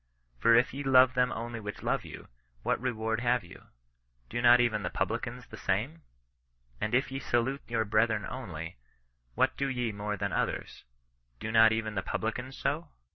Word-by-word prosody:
For 115 - +5
if 120 +1 +3
ye 140 - -4
love 130 -2 +6
them 125 0 +2
(only) 115 0 -4
which 105 -1 -7
love - - 0
you, - - -10 0.4
what - - 0
reward 110 -3 -1
have 120 -2 +1
you? 85 - -14 0.6
Do 120 - -1
not 120 0 +7
even 115 -3 +2
the - - -2
publicans - - -3
the - - -11
same? 80 +1 -1 0.8
And 110 +2 0
if 130 +1 +1
ye 135 - -3
salute 130 +2 0
your 115 -1 0
brethren 110 0 +2
only, 90 -10 -6 0.6
what - - +2
do 140 - 0
ye 125 -4 -1
more 105 0 -3
than - - -2
others? - - -2 0.5
Do 110 - -4
not 110 0 +7
even 110 -1 -1
the 95 - -1
publicans 125 +7 -3
so 150 +5 -2
115 Hz, 180 wpm, -30 LUFS, 110-125 Hz, 0.8 s, not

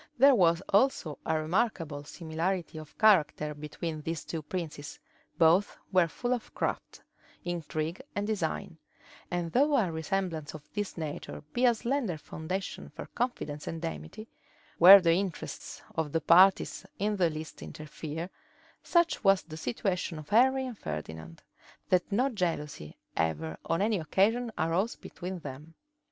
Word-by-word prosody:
There 275 +3 +7
was 175 -5 +4
also 200 - +2
a 160 -1 +2
remarkable 160 -4 -1
similarity 165 +1 -3
of 155 -1 -12
character 160 -8 +4
between 155 +2 -5
these 165 0 -4
two 165 - -4
princes; 155 -3 -5 0.4
both 170 +5 +4
were 180 -3 +4
full 245 +9 -2
of 245 - -4
craft, - - -3 0.4
intrigue, 165 - -3
and 205 - -1
design: 190 -3 -2 0.5
and 175 -2 -2
though 285 - +4
a 195 -9 +2
resemblance 160 -2 -2
of 150 -1 -11
this 205 -3 -3
nature 155 -2 -5
be 250 - +2
a 240 - +4
slender 235 - -1
foundation 160 +5 -5
for - - -8
confidence 155 -12 -3
and 165 0 -4
amity, 215 +6 -6 0.5
where 190 +4 +12
the 165 -2 +4
interests 185 -1 -4
of 160 -2 -2
the 165 - +1
parties 185 +3 +5
in 210 +1 0
the 175 -3 +3
least 155 0 -7
interfere, 155 +3 -6 0.5
such 340 -1 +2
was 195 -2 +5
the 155 - -9
situation 170 - -2
of 155 -1 -10
Henry 260 +5 +4
and 245 -5 -7
Ferdinand, 80 +1 -7 0.5
that 180 +2 +2
no 245 +7 +3
jealousy 165 - -3 0.2
ever 80 0 -1
on 165 +4 +1
any 215 -2 +1
occasion 220 +9 +1
arose 175 +8 0
between 185 +1 -7
them. 150 +1 -9
170 Hz, 145 wpm, -30 LUFS, 155-205 Hz, 0.5 s, where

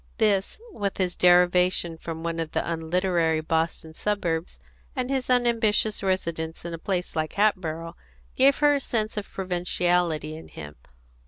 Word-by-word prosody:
This, 205 - +1
with 200 -2 -3
his 180 -2 0
derivation 180 -1 +4
from 160 0 -7
one 165 0 -2
of 160 -1 -4
the - - -1
unliterary 165 0 +1
Boston 160 0 -2
suburbs, 175 -3 -2 0.4
and 255 0 -2
his 265 -2 -1
unambitious 230 -4 +2
residence 170 -4 -2
in 170 - -5
a 165 - -5
place 180 0 -2
like 155 -1 -1
Hatboro', 170 -5 0 0.4
gave 270 +2 +5
her 295 -1 +4
a 285 - +1
sense 220 -4 -2
of 210 -1 -5
provinciality 175 -4 0
in 160 - -10
him. 75 -1 -10
180 Hz, 150 wpm, -25 LUFS, 165-210 Hz, 0.4 s, gave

